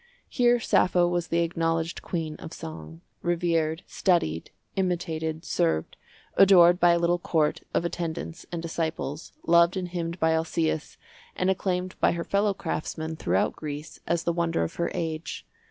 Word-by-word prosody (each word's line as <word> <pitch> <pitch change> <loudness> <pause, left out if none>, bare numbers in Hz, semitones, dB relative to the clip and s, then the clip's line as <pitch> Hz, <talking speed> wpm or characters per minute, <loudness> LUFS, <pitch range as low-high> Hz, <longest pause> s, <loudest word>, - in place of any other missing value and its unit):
Here 245 -1 +3
Sappho 180 -5 +3
was 175 -1 -1
the 170 0 +2
acknowledged 165 0 -1
queen 160 -3 -3
of 165 - -9
song—revered, 160 - -3
studied, 80 - 0 0.3
imitated, 165 -4 -2
served, 80 -2 0 0.4
adored 180 -2 +7
by 175 -1 +6
a - - +3
little 170 +1 +2
court 160 -3 +1
of 170 - 0
attendants 170 -1 -4
and 170 -1 -4
disciples, 160 -3 -3
loved 170 +2 +5
and 180 -1 -3
hymned 170 0 -4
by 160 0 +3
Alcæus, 160 -1 -1 0.4
and 185 +1 +2
acclaimed 185 -1 -1
by - - +3
her 170 -1 -3
fellowcraftsmen 170 -5 -1
throughout 90 +2 +1
Greece 150 0 -7
as 170 -1 +1
the 170 - +1
wonder 165 - 0
of 80 - -3
her 170 - 0
age. 165 -2 -4
170 Hz, 145 wpm, -27 LUFS, 160-175 Hz, 0.4 s, adored